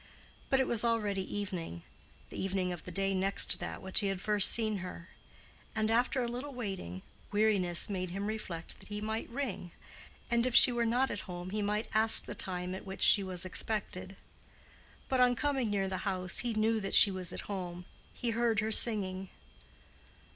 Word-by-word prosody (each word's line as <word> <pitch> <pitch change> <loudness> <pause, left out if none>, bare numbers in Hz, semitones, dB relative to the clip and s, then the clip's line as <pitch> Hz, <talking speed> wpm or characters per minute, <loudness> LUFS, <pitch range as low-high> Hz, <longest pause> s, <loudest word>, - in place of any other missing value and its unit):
But 270 - +2
it 265 - +2
was 235 -3 +1
already 210 -4 -1
evening—the 180 - -8
evening 190 -1 -2
of 175 - -10
the 180 - -7
day 195 +2 0
next 195 +1 +4
to - - +4
that - - -6
which 190 0 +5
he 205 - -1
had 195 -1 -3
first 210 0 +3
seen 220 -2 +2
her; 180 -1 -9 0.7
and 220 0 0
after 245 +2 +1
a - - -2
little 250 +4 -6
waiting, 190 - -6 0.3
weariness 205 -5 +2
made 185 -3 -4
him 195 +3 -5
reflect 205 -6 -6
that - - -12
he 205 0 -6
might 220 +1 -4
ring, 245 -8 -5 0.6
and 235 +1 +2
if 250 - -3
she - - +9
were 235 -1 -1
not 250 +4 0
at 205 - -4
home 175 +1 -7
he 210 +1 -2
might 210 +2 -2
ask 220 +1 +6
the - - -6
time 180 -1 -2
at 190 - -7
which 190 0 -5
she 205 - +6
was 185 -1 -1
expected. 190 -1 -3 0.9
But 260 - -1
on 250 0 +4
coming 270 -3 -1
near 195 -2 -1
the 190 0 -4
house 185 -2 0
he 240 -2 -2
knew 220 +1 +1
that 195 -2 -2
she 200 - +7
was 185 -2 -5
at - - -6
home: 180 -3 -7 0.3
he 240 -2 -4
heard 230 -1 0
her 220 0 -2
singing. 195 -5 +2
205 Hz, 190 wpm, -31 LUFS, 185-225 Hz, 0.9 s, she